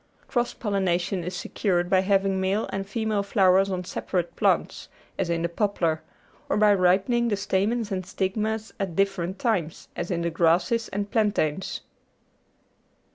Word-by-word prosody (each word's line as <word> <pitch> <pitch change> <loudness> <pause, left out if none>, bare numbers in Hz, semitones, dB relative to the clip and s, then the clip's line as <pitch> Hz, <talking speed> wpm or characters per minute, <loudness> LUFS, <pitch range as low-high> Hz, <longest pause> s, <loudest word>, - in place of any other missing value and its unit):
Cross 240 -1 -1
pollination 190 -3 0
is 180 +2 -4
secured 175 -1 -1
by 185 +1 +4
having 195 0 +2
male 195 +3 0
and 195 0 -3
female 220 -1 0
flow 195 -2 +3
ers 195 +1 +3
on 185 -1 -2
separate 180 -1 -3
plants, - - 0 0.3
as 185 - 0
in 170 -1 0
the - - +2
poplar, 170 -4 0 0.5
or - - +1
by 210 -1 +5
ripening 195 +6 +3
the 205 -3 0
stamens 205 +3 0
and 185 -1 -2
stigmas 210 +4 -2
at 190 -4 -3
different 195 -1 0
times, 190 - -1
as - - -4
in 170 -2 -1
the 170 - -1
grasses 175 +8 +2
and 205 +1 -4
plantains. 195 -6 0
195 Hz, 155 wpm, -25 LUFS, 180-205 Hz, 0.5 s, by